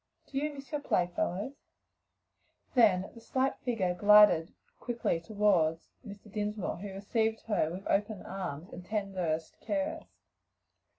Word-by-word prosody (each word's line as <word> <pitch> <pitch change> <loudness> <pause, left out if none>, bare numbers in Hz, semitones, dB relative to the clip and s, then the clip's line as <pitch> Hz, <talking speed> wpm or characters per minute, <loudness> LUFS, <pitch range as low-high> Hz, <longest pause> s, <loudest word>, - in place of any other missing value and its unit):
do 270 - -3
you 300 +1 -1
miss 275 0 -11
your 295 -1 -2
playfellows?" 185 - -1 1.1
then 200 -7 +4 0.9
glided 210 -5 +7 0.3
quickly 235 -8 -1
toward 180 -4 +2 0.3
Mr. 205 -2 -11
Dinsmore, 210 -1 -2
who 195 +2 -7
received 220 +3 -1
her 205 -8 0
with 185 +4 -7
open 205 0 0
arms 180 -4 -6
and 180 - -8
tenderest 185 -6 -2
caress. 305 +2 -2
205 Hz, 110 wpm, -31 LUFS, 180-225 Hz, 1.1 s, glided